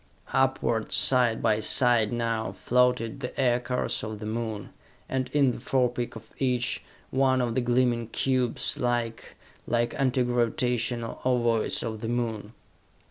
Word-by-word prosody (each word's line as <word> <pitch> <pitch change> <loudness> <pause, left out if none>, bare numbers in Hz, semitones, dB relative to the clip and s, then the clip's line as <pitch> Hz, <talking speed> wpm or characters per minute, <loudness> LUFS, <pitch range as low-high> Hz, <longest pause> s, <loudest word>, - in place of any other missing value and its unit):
Upward, 130 -4 +1
side 125 -3 +3
by 110 -2 +3
side 115 -1 +3
now, 115 -2 -2
floated 125 0 +1
the 125 0 -6
aircars 125 0 0
of 110 0 -5
the 105 - -7
Moon, 110 -2 -4 0.4
and 130 -1 -2
in 140 -3 +3
the - - -7
forepeak 125 -1 -1
of 115 - -12
each, 125 -2 0 0.3
one 130 0 +2
of 120 -2 0
the 130 - +1
gleaming 120 -1 +1
cubes, 130 0 0
like 120 -2 -2 0.3
like 120 0 0
anti 130 -2 +1
gravitational 120 -1 -1
ovoids 120 -3 +1
of 110 -2 -5
the 115 - -3
Moon! 115 -3 -3
120 Hz, 135 wpm, -27 LUFS, 115-125 Hz, 0.4 s, side